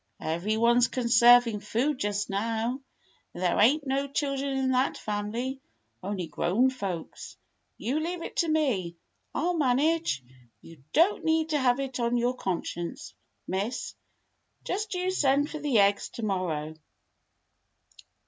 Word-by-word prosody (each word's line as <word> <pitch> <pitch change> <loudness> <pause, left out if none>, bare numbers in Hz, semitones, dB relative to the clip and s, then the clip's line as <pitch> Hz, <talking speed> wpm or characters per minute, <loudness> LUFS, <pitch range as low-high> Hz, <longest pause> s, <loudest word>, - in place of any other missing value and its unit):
Every 175 +7 -1
one 235 +2 +4
's 245 - +5
conserving 235 -2 +5
food 255 +7 -1
just 205 0 -1
now, 225 +5 -2 0.5
and 180 - -5
there 175 - +2
ain't 285 +7 +4
no 275 +1 0
children 275 -1 -2
in 260 -1 +1
that 255 +1 +1
family, 225 +6 -3 0.4
only 190 -2 -3
grown 190 - +1
folks. 195 -10 -6 0.4
You 265 +7 -1
leave 335 +2 -3
it - - -8
to 335 - +2
me. 245 - 0 0.4
I'll 355 +1 +1
manage; 295 - +1 0.4
you 165 -5 -15
don't 345 +7 +3
need 320 0 +1
to 300 -2 +1
have 255 -1 +2
it 265 -2 -4
on 235 0 +1
your 240 +1 +1
conscience. 175 -5 -4 0.3
Miss. 200 +7 -3 0.7
Just 420 +1 -3
you 365 +1 0
send 285 -4 +2
for 310 - -5
the 285 -5 +1
eggs 200 0 +3
to 235 - -6
morrow." 165 -6 -2
245 Hz, 140 wpm, -28 LUFS, 205-280 Hz, 0.7 s, s